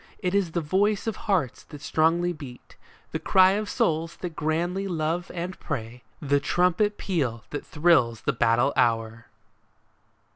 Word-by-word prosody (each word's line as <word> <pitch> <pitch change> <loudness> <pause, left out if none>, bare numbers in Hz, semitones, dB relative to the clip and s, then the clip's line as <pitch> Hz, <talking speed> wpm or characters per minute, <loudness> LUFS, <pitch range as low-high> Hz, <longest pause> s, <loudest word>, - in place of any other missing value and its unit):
It 180 -2 -2
is 195 -5 +1
the 170 - 0
voice 195 +6 +1
of 225 -3 -2
hearts 180 - -1
that 150 - -11
strongly 165 +4 +1
beat, 135 -6 -12 0.4
The - - -2
cry 185 0 +5
of 205 +1 -2
souls 165 +1 0
that 175 -3 -5
grandly 175 +5 -1
love 170 0 -2
and 180 +1 -5
pray, 125 -4 -5 0.2
The 145 0 +1
trumpet 180 +7 +1
peal 130 - -2
that 145 - -4
thrills 150 -9 +3
the - - 0
battle 120 +4 +2
hour 115 -1 0
165 Hz, 150 wpm, -26 LUFS, 135-180 Hz, 0.4 s, cry